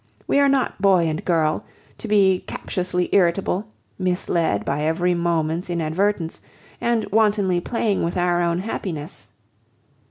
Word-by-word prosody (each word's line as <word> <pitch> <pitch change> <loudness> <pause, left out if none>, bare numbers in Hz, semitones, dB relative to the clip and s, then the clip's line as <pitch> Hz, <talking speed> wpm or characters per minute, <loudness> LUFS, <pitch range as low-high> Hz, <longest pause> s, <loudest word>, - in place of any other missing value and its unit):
We - - +2
are 280 -1 +4
not 270 -7 0
boy 190 -4 +4
and 155 0 -3
girl, 160 -3 +1 0.4
to - - -6
be 195 -3 +4
captiously 180 -1 -2
irritable, 185 +2 +1 0.3
misled 175 - 0
by 140 +2 -1
every 165 +3 +1
moment's 170 0 -1
inadvertence, 170 +1 -1 0.4
and 235 -2 +1
wantonly 205 -4 +2
playing 220 0 -1
with 170 +2 -2
our 175 0 +2
own 170 0 +1
happiness." 165 - -5
180 Hz, 130 wpm, -22 LUFS, 165-200 Hz, 0.4 s, are